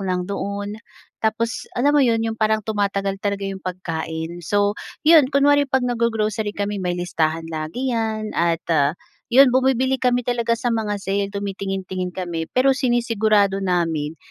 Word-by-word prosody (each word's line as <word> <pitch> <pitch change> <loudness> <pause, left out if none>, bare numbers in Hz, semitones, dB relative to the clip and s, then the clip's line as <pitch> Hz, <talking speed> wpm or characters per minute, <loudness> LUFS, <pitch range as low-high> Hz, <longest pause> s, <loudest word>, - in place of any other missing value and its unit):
lang 185 -2 -1
doon, 200 +1 -4 0.5
tapos 225 +1 -1
alam 280 +4 +3
mo 295 - +4
'yon 230 -4 +2
'yong 225 - -1
parang 215 -1 +2
tumatagal 200 -2 -1
talaga 200 -1 -2
'yong 195 -1 -4
pagkain. 165 -2 -5
So, 205 +4 +1 0.3
'yon 310 -4 +7
kunwari 285 0 +3
pag 265 -1 +1
nag-go-grocery 220 -3 -1
kami 205 -1 -2
may 180 -1 -1
listahan 165 -2 -1
lagi 160 +12 -3
yan 220 -2 -2
at, 170 -1 0
ah, 145 +1 +2 0.3
'yon 260 +1 +6
bumibili 260 0 +2
kami 245 -1 +1
talaga 235 -1 0
sa 245 0 -1
mga 215 -2 -1
sale 200 0 -2
tumitingin-tingin 195 -2 -4
kami 175 -3 -4
pero 265 +2 +3
sinisigurado 220 -6 +2
namin 165 -5 -1
205 Hz, 150 wpm, -21 LUFS, 185-240 Hz, 0.5 s, yon